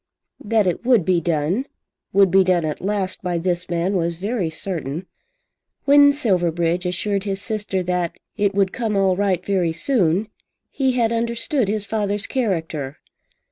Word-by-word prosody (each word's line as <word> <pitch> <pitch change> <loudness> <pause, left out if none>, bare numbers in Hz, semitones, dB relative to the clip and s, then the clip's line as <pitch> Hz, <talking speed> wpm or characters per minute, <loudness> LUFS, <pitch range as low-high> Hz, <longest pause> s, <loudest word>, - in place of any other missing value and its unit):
That 220 -2 +2
it 180 +3 -1
would 240 -8 +3
be 180 -2 +2
done, 170 - 0 0.4
would 195 -2 +4
be 190 +1 +6
done 180 -3 +2
at 150 -1 -3
last, 195 -1 -2
by 180 -2 -1
this 175 +1 -2
man 175 +3 0
was 170 -1 0
very 195 0 -2
certain. 160 -1 -5 0.8
When 285 0 +7
Silverbridge 180 - 0
assured 195 +2 -1
his 195 -1 -2
sister 205 -3 -2
that 180 -1 -1 0.2
"it 205 -2 0
would 195 -2 +2
come 225 -4 -1
all 195 -2 +3
right 190 -2 0
very 185 -4 +1
soon," 190 - +1 0.4
he 265 -2 +1
had 235 -2 +1
understood 235 - 0
his 210 0 -1
father's 205 0 -1
character. 160 - -2
190 Hz, 155 wpm, -21 LUFS, 175-215 Hz, 0.8 s, When